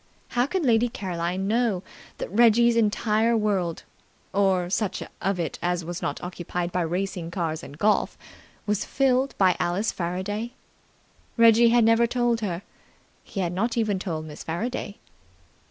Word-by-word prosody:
How 245 Hz, +1 st, +1 dB
could 355 Hz, -1 st, -1 dB
Lady 240 Hz, 0 st, +3 dB
Caroline 185 Hz, -2 st, -3 dB
know 220 Hz, -4 st, +1 dB, 0.3 s
that -, -, -5 dB
Reggie's 235 Hz, +2 st, +5 dB
entire 225 Hz, +1 st, +2 dB
world 195 Hz, -6 st, -1 dB, 0.5 s
or 190 Hz, -3 st, +2 dB
such 195 Hz, +1 st, -1 dB, 0.2 s
of 195 Hz, -1 st, 0 dB
it 165 Hz, -, -3 dB
as 175 Hz, -1 st, -1 dB
was 175 Hz, +1 st, -5 dB
not 145 Hz, -, -2 dB
occupied 175 Hz, 0 st, -4 dB
by 180 Hz, -, 0 dB
racing 175 Hz, 0 st, -2 dB
cars 165 Hz, -3 st, -2 dB
and 145 Hz, -, -11 dB
golf 210 Hz, +4 st, +1 dB, 0.5 s
was 210 Hz, -1 st, 0 dB
filled 265 Hz, 0 st, +1 dB
by 185 Hz, -2 st, +4 dB
Alice 180 Hz, +5 st, 0 dB
Faraday? 195 Hz, +7 st, -3 dB, 0.8 s
Reggie 230 Hz, 0 st, +6 dB
had 235 Hz, 0 st, +4 dB
never 230 Hz, +1 st, +4 dB
told 240 Hz, -1 st, +1 dB
her. 185 Hz, -3 st, -3 dB, 0.6 s
He 195 Hz, -, -5 dB
had 175 Hz, -1 st, -1 dB
not 230 Hz, +6 st, -1 dB
even 210 Hz, -4 st, +1 dB
told 160 Hz, -5 st, -4 dB
Miss 150 Hz, -1 st, -9 dB
Faraday. 210 Hz, +5 st, -4 dB
200 Hz, 150 wpm, -25 LUFS, 175-230 Hz, 0.8 s, Reggie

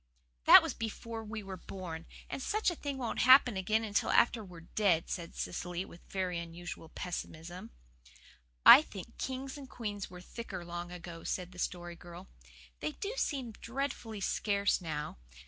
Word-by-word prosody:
"That -, -, +11 dB
was -, -, -2 dB
before 225 Hz, 0 st, -5 dB
we 215 Hz, 0 st, -6 dB
were 190 Hz, -1 st, -6 dB
born, 170 Hz, -3 st, -7 dB, 0.2 s
and -, -, -5 dB
such 425 Hz, +5 st, +1 dB
a -, -, -5 dB
thing 285 Hz, -3 st, -4 dB
won't 245 Hz, -3 st, -2 dB
happen 255 Hz, -3 st, +7 dB
again 215 Hz, +4 st, +1 dB
until 205 Hz, -2 st, 0 dB
after 235 Hz, -2 st, +4 dB
we're 180 Hz, -4 st, -11 dB
dead," 185 Hz, -6 st, +2 dB
said 170 Hz, -2 st, -4 dB
Cecily, 175 Hz, +1 st, -3 dB
with 170 Hz, -, -13 dB
very 185 Hz, -3 st, -1 dB
unusual 170 Hz, -1 st, -7 dB
pessimism. 175 Hz, -4 st, -6 dB, 1.0 s
"I -, -, +12 dB
think 225 Hz, -, -10 dB
queens 265 Hz, +2 st, -4 dB
and 270 Hz, -2 st, -10 dB
kings 205 Hz, -4 st, -4 dB
were 180 Hz, -1 st, -10 dB
thicker 180 Hz, -1 st, -7 dB
long 175 Hz, 0 st, -5 dB
ago," 175 Hz, -1 st, -8 dB
said 180 Hz, -1 st, -3 dB
the 180 Hz, -, -11 dB
Story 175 Hz, -1 st, -3 dB
Girl. 175 Hz, +2 st, -11 dB, 0.5 s
"They 150 Hz, -, -2 dB
do 410 Hz, +3 st, -4 dB
seem 270 Hz, -, -1 dB
dreadfully 230 Hz, -2 st, -4 dB
scarce 200 Hz, 0 st, +1 dB
now. 150 Hz, -, -4 dB
190 Hz, 165 wpm, -33 LUFS, 175-230 Hz, 1.0 s, I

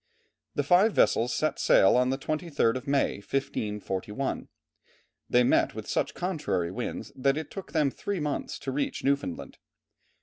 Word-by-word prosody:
The 145 Hz, -, +1 dB
five 185 Hz, +9 st, +4 dB
vessels 120 Hz, +2 st, +3 dB
set 155 Hz, -, 0 dB
sail 95 Hz, -, +5 dB
on 125 Hz, +1 st, +3 dB
the 135 Hz, -, 0 dB
23rd 150 Hz, -5 st, 0 dB
of 130 Hz, +3 st, -5 dB
May, 140 Hz, -1 st, +1 dB
1541. 105 Hz, -1 st, -3 dB, 0.8 s
They 125 Hz, 0 st, +5 dB
met -, -, +2 dB
with -, -, -7 dB
such -, -, -1 dB
contrary 150 Hz, -, -1 dB
winds 115 Hz, 0 st, -5 dB
that 135 Hz, +2 st, +1 dB
it 155 Hz, -2 st, -5 dB
took 195 Hz, -, -8 dB
them 150 Hz, -4 st, +2 dB
three 200 Hz, +5 st, -3 dB
months 150 Hz, -1 st, -3 dB
to 135 Hz, -, -3 dB
reach 140 Hz, +2 st, -2 dB
Newfoundland. 140 Hz, -10 st, -2 dB
135 Hz, 155 wpm, -28 LUFS, 120-155 Hz, 0.8 s, sail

